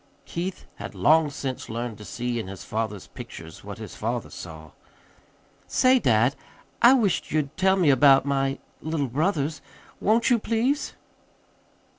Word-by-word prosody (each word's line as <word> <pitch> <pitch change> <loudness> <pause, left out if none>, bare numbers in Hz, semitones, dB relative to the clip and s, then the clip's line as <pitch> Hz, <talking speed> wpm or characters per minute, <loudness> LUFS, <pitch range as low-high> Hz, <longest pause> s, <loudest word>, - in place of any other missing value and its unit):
(Keith 180 +2 -4
had - - -7
long 155 0 +4
since 135 -2 -5
learned 115 0 -4
to - - -9
see 120 +1 -3
in 110 - -5
his 95 -1 -8
father's 110 -3 -3
pictures - - -10
what - - -7
his - - -8
father - - -3
saw.) 80 -3 -9 1.0
"Say, 255 0 +4
dad, 120 - +3 0.5
I 240 +2 +8
wish't 210 -9 +1
you'd 150 -2 -1
tell 190 0 +3
me 175 -7 +4
about 135 0 +6
my 135 -1 0 0.2
little 155 -2 -1
brothers. 150 +2 -1 0.4
Won't 225 +4 +2
you, 240 - +5
please?" 235 +7 0
145 Hz, 145 wpm, -25 LUFS, 120-190 Hz, 1.0 s, I